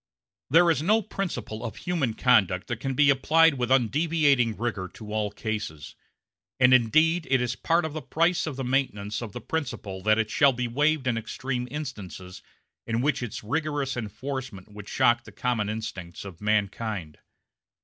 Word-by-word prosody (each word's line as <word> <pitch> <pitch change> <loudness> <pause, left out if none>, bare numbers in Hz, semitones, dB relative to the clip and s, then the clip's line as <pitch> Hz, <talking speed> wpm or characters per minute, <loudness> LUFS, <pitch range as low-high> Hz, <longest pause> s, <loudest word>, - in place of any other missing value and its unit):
There 170 +4 +6
is 145 -3 0
no 215 +7 +3
principle 125 - -4
of 110 -3 -5
human 155 -11 -1
conduct 100 -8 +3
that 120 -2 -3
can 135 +1 -3
be 145 +1 +5
applied 155 +2 +4
with 125 0 -1
undeviating 135 -2 +2
rigor 105 -5 -2
to 105 -1 -8
all 105 -1 0
cases; 105 -8 -5 0.7
and 130 0 +6
indeed 155 +8 +3
it 130 -1 +4
is 125 0 -1
part 165 +6 +1
of 160 - -4
the 155 - -4
price 165 +5 +1
of 150 - -4
the 135 - -4
maintenance 115 -6 -1
of 115 -3 -6
the - - -6
principle 115 -11 -4
that 110 +2 +3
it 110 -1 0
shall 140 0 +4
be 125 0 -2
waived 145 +3 +1
in 120 -3 +1
extreme 125 +2 -4
instances 105 -10 -7 0.5
in 115 0 0
which 140 -1 +1
its 120 -3 -5
rigorous 145 +2 -1
enforcement 120 -3 -6
would 105 0 -10
shock 120 0 +3
the 105 - -13
common 110 -1 -1
instincts 100 -6 -6
of 90 -4 -10
mankind. 105 -5 -1
125 Hz, 170 wpm, -26 LUFS, 105-145 Hz, 0.7 s, There